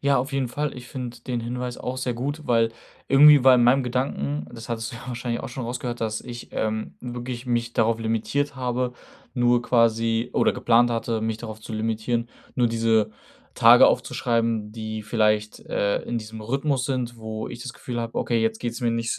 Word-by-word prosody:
Ja, 140 0 +3
auf 135 +3 -3
jeden 135 -3 0
Fall. 145 +2 -3
Ich 125 0 -9
finde 125 -2 -6
den 120 -1 -3
Hinweis 125 +1 -4
auch 125 +1 -4
sehr 130 -1 -1
gut, 145 +6 -4
weil 115 -1 +3 0.4
irgendwie 145 0 +8
war 130 -1 +8
in 120 - +4
meinem 130 +3 +5
Gedanken, 75 - -2
das 115 0 -9
hattest 115 -1 -3
du - - -7
ja 115 - -10
wahrscheinlich 120 -1 -3
auch 135 - -5
schon 125 0 -5
rausgehört, 120 0 -4
dass 110 -1 -2
ich, 120 -1 -9
ähm, 110 0 -2
wirklich 120 0 -6
mich 120 -1 0
darauf 115 0 +2
limitiert 115 +6 -1
habe, 125 -1 -1 0.4
nur 120 -1 +3
quasi 115 0 +2
oder - - +3
geplant 120 +1 +3
hatte, 115 -1 -1
mich 110 0 -2
darauf 110 -2 -8
zu 110 - -9
limitieren, 115 +2 -1 0.3
nur 125 -2 +3
diese 115 -2 +2 0.4
Tage - - +8
aufzuschreiben, 115 -3 0
die 110 -1 -5
vielleicht, 105 -1 +1
äh, 100 0 -1
in 120 -1 -3
diesem 110 0 -8
Rhythmus 135 +3 0
sind, 125 -3 -2
wo 110 -1 -5
ich 120 0 -8
das 125 - -6
Gefühl 120 -2 -5
habe: 115 0 -5
„Okay, 115 -2 +1
jetzt 110 0 0
geht's 120 +1 -4
mir 120 -1 +1
nicht, 115 0 -1
120 Hz, 195 wpm, -24 LUFS, 115-125 Hz, 0.4 s, irgendwie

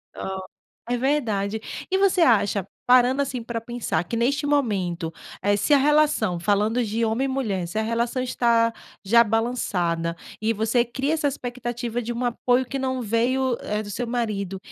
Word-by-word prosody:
Ó, 190 0 -4 0.5
é - - +1
verdade. 220 -7 0 0.3
E 380 - +3
você 390 -2 +3
acha 205 - +3 0.2
parando, 255 +2 +5
assim, 250 -4 -3
pra 235 -1 -3
pensar, 240 +1 -2
que 230 - -4
neste 275 +6 +1
momento, 190 - 0 0.3
eh, 205 +1 +2
se 250 +9 +2
a - - +8
relação 290 - +2
falando 210 +6 +1
de 225 +2 -1
homem 225 +4 +1
e - - 0
mulher, 215 -10 -2
se 175 - -6
a 220 - +2
relação 235 +3 -1
está 235 -2 +2 0.3
já 235 +4 +5
balançada, 185 -7 -1 0.3
e 225 +1 +1
você 225 +3 +1
cria 270 +5 -1
essa 310 -2 +1
expectativa 245 -3 -4
de 240 +1 -4
um 240 +2 -3
apoio 245 +1 +1
que 270 +2 -4
não 260 -1 -1
veio, 240 +3 +1
eh, 210 +1 -3
do 205 - -7
seu 245 +4 -3
marido, 210 -5 -2
235 Hz, 175 wpm, -24 LUFS, 210-255 Hz, 0.5 s, a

